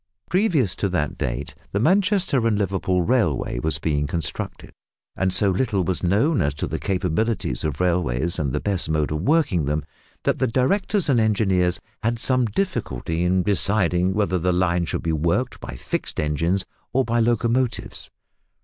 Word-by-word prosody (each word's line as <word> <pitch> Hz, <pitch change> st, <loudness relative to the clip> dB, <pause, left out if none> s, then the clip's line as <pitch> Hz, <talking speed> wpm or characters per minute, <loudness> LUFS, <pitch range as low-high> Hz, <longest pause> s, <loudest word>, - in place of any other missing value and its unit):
Previous 175 Hz, -, +2 dB
to 100 Hz, -, 0 dB
that 80 Hz, -6 st, -1 dB
date 65 Hz, +3 st, -3 dB, 0.2 s
the 100 Hz, -, +1 dB
Manchester 185 Hz, -, +3 dB
and 110 Hz, -2 st, +1 dB
Liverpool 95 Hz, -2 st, 0 dB
Railway 85 Hz, -, +1 dB
was 80 Hz, +1 st, -1 dB
being 75 Hz, -1 st, -1 dB
constructed, 85 Hz, 0 st, -4 dB, 0.4 s
and 95 Hz, 0 st, 0 dB
so 100 Hz, +1 st, +2 dB
little 100 Hz, -1 st, 0 dB
was 90 Hz, +1 st, -2 dB
known 110 Hz, -, +2 dB
as 70 Hz, 0 st, 0 dB
to -, -, -2 dB
the -, -, -4 dB
capabilities 95 Hz, +4 st, -1 dB
of 75 Hz, -2 st, -2 dB
railways 85 Hz, -3 st, +1 dB
and 70 Hz, -4 st, -1 dB
the 75 Hz, -, -1 dB
best 95 Hz, -3 st, 0 dB
mode 75 Hz, -1 st, 0 dB
of 75 Hz, 0 st, -2 dB
working 125 Hz, -, +2 dB
them, 75 Hz, 0 st, -1 dB, 0.4 s
that -, -, 0 dB
the 130 Hz, -, +2 dB
directors 185 Hz, -, +1 dB
and 130 Hz, -5 st, +3 dB
engineers 95 Hz, -5 st, +2 dB, 0.2 s
had 115 Hz, +1 st, 0 dB
some 130 Hz, +1 st, +2 dB
difficulty 95 Hz, -, -2 dB
in 90 Hz, +1 st, +2 dB
deciding 95 Hz, -2 st, +2 dB
whether 100 Hz, -3 st, +1 dB
the 90 Hz, +2 st, +1 dB
line 90 Hz, -1 st, +1 dB
should -, -, -3 dB
be 80 Hz, -1 st, 0 dB
worked 80 Hz, +2 st, 0 dB
by -, -, -7 dB
fixed -, -, -4 dB
engines 85 Hz, +5 st, 0 dB, 0.3 s
or 130 Hz, 0 st, +2 dB
by 120 Hz, 0 st, +1 dB
locomotives. 120 Hz, +2 st, 0 dB
95 Hz, 165 wpm, -23 LUFS, 80-115 Hz, 0.4 s, Manchester